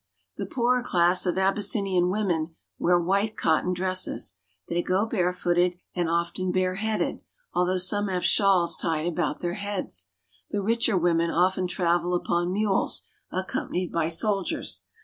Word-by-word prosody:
The - - -4
poorer 250 0 +1
class 180 -5 +4
of 180 - 0
Abyssinian 195 -2 +1
women 175 -5 -1 0.2
wear 175 0 +3
white 200 +5 0
cotton 160 +3 +1
dresses; 185 - 0 0.3
they 170 +1 0
go 190 +4 +1
barefooted 180 -3 +1 0.2
and 175 -2 -1
often 170 +2 -1
bareheaded, 185 +4 -1 0.4
al 180 - +2
though 185 +1 +1
some 205 +3 +1
have 185 -2 -1
shawls 190 -4 +3
tied 160 -1 -1
about 170 -3 -2
their 175 0 -2
heads. 195 - -3 0.4
The 205 -1 -2
richer 230 -1 +2
women 170 -1 +2
often 185 +2 +1
travel 175 0 0
upon 175 0 0
mules, 200 0 +1 0.3
accompanied 185 -1 -3
by 165 -1 0
soldiers. 195 +3 0
180 Hz, 140 wpm, -26 LUFS, 175-195 Hz, 0.4 s, class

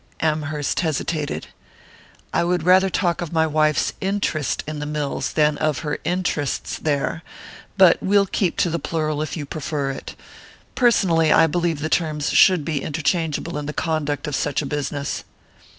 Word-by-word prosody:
Amherst 150 -2 -1
hesitated. 155 -2 -2 0.9
"I - - +2
would 175 -1 0
rather 185 +2 +5
talk 175 -2 0
of 170 - -4
my 160 -1 +2
wife's 155 -1 +1
interest 190 -7 -1
in 155 0 -5
the 150 - -4
mills 150 -2 -2
than 150 -1 +2
of 155 -3 0
her 150 - -2
interests 175 -6 -2
there; 150 +2 -1 0.6
but 185 -3 +6
we'll 200 +1 +3
keep 190 -2 -1
to 175 - +1
the 170 - -1
plural 155 -1 -2
if 155 - -4
you 150 - -4
prefer 145 -1 -3
it. 135 - -8 0.6
Personally, 175 -10 +3
I 165 - +6
believe 165 -1 -1
the 155 - -1
terms 155 -3 0
should 180 -6 +5
be 155 -4 -1
interchangeable 160 0 -1
in 145 - -6
the 150 - -4
conduct 150 -3 -2
of 150 -3 -2
such 145 +1 -1
a - - -4
business." 145 0 -3
155 Hz, 165 wpm, -22 LUFS, 150-170 Hz, 0.9 s, but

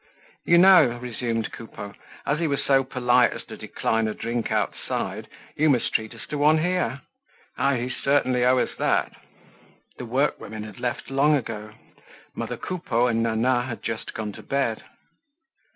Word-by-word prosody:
"You 170 - +5
know," 175 -10 +7
resumed 120 -2 -3
Coupeau, 105 -3 -9 0.3
"as 145 +2 0
he 170 - +1
was 140 -2 -1
so 135 -1 +4
polite 125 -2 +3
as - - -8
to - - -9
decline 115 0 -1
a 110 - -3
drink 115 0 -3
outside, - - -2 0.3
you 155 +1 +3
must 125 -5 +1
treat 110 -1 -1
us - - -10
to 150 - -3
one 155 +2 +5
here. 175 -5 0 0.6
Ah! 140 - +3
you 125 0 -2
certainly 130 -3 +1
owe 125 +1 +4
us - - 0
that!" - - +1 0.9
The 125 - -5
workwomen 115 -4 -1
had 105 -3 -10
left 120 +1 -3
long 145 +3 +4
ago. 110 -5 -5 0.6
Mother - - -4
Coupeau 135 -10 -1
and 115 -2 +1
Nana 115 +2 +2
had 120 -2 -6
just 115 -1 -4
gone 110 -1 -3
to - - -11
bed. 135 -5 -1
125 Hz, 165 wpm, -25 LUFS, 115-140 Hz, 0.9 s, know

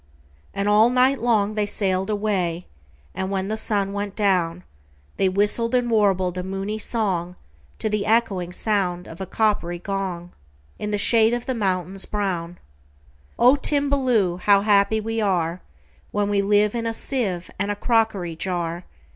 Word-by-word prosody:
And 200 - -2
all 210 +3 +5
night 255 +2 +3
long 215 -3 +2
they 210 -1 -1
sail'd 190 -2 -1
away; 190 -5 -1 0.5
And, 190 - -3
when 195 0 -2
the 215 - -1
sun 205 -3 0
went 200 -1 -4
down, 180 -4 0 0.5
They 190 - +2
whistled 210 +5 +2
and 245 -1 +1
warbled 190 -4 +2
a - - -3
moony 195 +3 -4
songTo 185 -6 -1 0.5
the 210 -2 -1
echoing 205 -6 +1
sound 185 -3 -1
of 165 +3 -10
a 190 - -4
coppery 200 -5 0
gong, 180 -2 -4 0.5
In 210 - -3
the 210 - 0
shade 225 +2 +4
of 240 - -5
the 260 - -1
mountains 190 -3 -1
brown,"O 120 - -2
Timballoo! 260 - +1
how 200 +1 +4
happy 205 +1 +3
we 225 +1 -4
areWhen 180 -5 0 0.5
we 205 -1 +1
live 205 +1 +2
in 230 -1 -2
a 225 - -2
sieve 200 -12 -3
and 200 +1 -1
a 205 - -1
crockery 210 -7 0
jar! 175 0 -3
200 Hz, 150 wpm, -23 LUFS, 180-220 Hz, 0.5 s, all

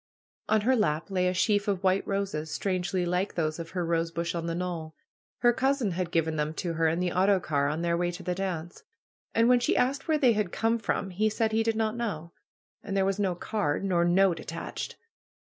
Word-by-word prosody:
On 215 -1 +4
her 260 +5 +3
lap 165 -5 0
lay 180 -1 +1
a 180 - +1
sheaf 205 +2 +2
of 195 -2 -1
white 190 +1 +2
roses, 195 -6 -2
strangely 185 +1 -1
like 180 +3 -1
those 155 -1 -1
of 165 0 -6
her 175 - 0
bush 170 0 -1
on 170 -1 -3
the 165 - -2
knoll. 170 -3 -4 0.5
Her 240 0 +5
cousin 265 -4 +1
had 180 0 -2
given 160 -2 0
them 150 +1 -1
to 170 0 -2
her 165 0 +2
in 165 +2 +1
the 180 -1 0
autocar 180 -7 +2
on 155 +3 -2
their 170 0 +1
way 175 +1 0
to 175 +1 -7
the 180 - -1
dance. 175 -3 -4 0.5
And 230 +1 +4
when 250 0 +5
she 240 - +1
asked 270 +4 +1
where 315 -1 +3
they 255 -5 +4
had 210 -4 -1
come 230 +1 +1
from 200 -3 -2
he 215 +4 +1
said 220 +1 0
he 220 +1 +2
did 225 0 +1
not 220 0 0
know. 185 -9 -4 0.5
And 195 -1 -3
there 190 - +3
was 195 +1 0
no 190 -3 +1
card, 195 -4 -1
nor 180 -3 +2
note 180 +1 +3
at - - -11
tached. - - -5
185 Hz, 225 wpm, -28 LUFS, 170-215 Hz, 0.5 s, Her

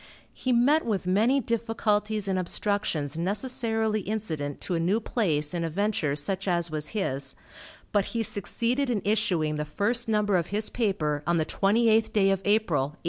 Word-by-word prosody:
He 255 - -2
met 270 +7 +4
with 205 -6 -2
many 220 +9 +3
difficulties 215 -3 0
and 190 -1 0
obstructions, 170 -6 -1
necessarily 220 +2 0
incident 165 -9 -4
to 185 - -2
a 170 - +1
new 185 +7 +1
place 160 -10 0
in 170 -1 -1
a 165 - -1
venture 180 -5 0
such 190 +7 -2
as 170 -2 0
was 150 -1 -1
his, 135 -8 -2 0.6
but 205 -2 +2
he 230 -1 -2
succeeded 235 +6 -1
in 220 -5 -1
issuing 185 -8 +1
the 150 - -1
first 225 +9 -1
number 210 -3 +2
of 170 -1 -1
his 210 +2 -2
paper 155 - 0
on 170 0 +2
the 160 - +1
twenty 210 +7 +2
eighth 225 0 +3
day 195 -2 +4
of 195 -1 0
April, 205 -7 +2
1849. 140 +4 -3
200 Hz, 180 wpm, -27 LUFS, 165-220 Hz, 0.6 s, met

